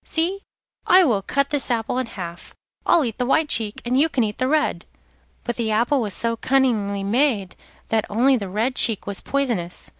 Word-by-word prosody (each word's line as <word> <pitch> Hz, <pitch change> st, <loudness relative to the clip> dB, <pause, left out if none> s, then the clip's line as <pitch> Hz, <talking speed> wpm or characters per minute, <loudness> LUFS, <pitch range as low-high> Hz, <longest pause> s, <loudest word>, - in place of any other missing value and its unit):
'See, 355 Hz, +5 st, -1 dB, 0.5 s
I 370 Hz, +1 st, +7 dB
will 225 Hz, -, +1 dB
cut 280 Hz, +7 st, -1 dB
this 290 Hz, -2 st, 0 dB
apple 235 Hz, +1 st, -1 dB
in 255 Hz, -, -3 dB
half. 175 Hz, -5 st, -9 dB, 0.3 s
I'll 330 Hz, -5 st, +4 dB
eat 230 Hz, 0 st, -5 dB
the 250 Hz, -, 0 dB
white 310 Hz, +2 st, +2 dB
cheek 215 Hz, -2 st, 0 dB
and 250 Hz, +2 st, +1 dB
you 320 Hz, +3 st, +3 dB
can 255 Hz, -6 st, 0 dB
eat 210 Hz, -1 st, -4 dB
the 255 Hz, -, +1 dB
red.' 300 Hz, -, 0 dB, 0.6 s
But 240 Hz, -, -4 dB
the 230 Hz, -2 st, -1 dB
apple 240 Hz, +6 st, +1 dB
was 210 Hz, -4 st, -2 dB
so 230 Hz, 0 st, 0 dB
cunningly 225 Hz, -6 st, 0 dB
made 215 Hz, -3 st, 0 dB, 0.3 s
that 220 Hz, -1 st, +1 dB
only 250 Hz, +6 st, +3 dB
the 200 Hz, -6 st, -4 dB
red 225 Hz, +7 st, -1 dB
cheek 225 Hz, -4 st, +4 dB
was 200 Hz, -1 st, -4 dB
poisonous. 235 Hz, -11 st, -3 dB
235 Hz, 200 wpm, -22 LUFS, 210-275 Hz, 0.6 s, I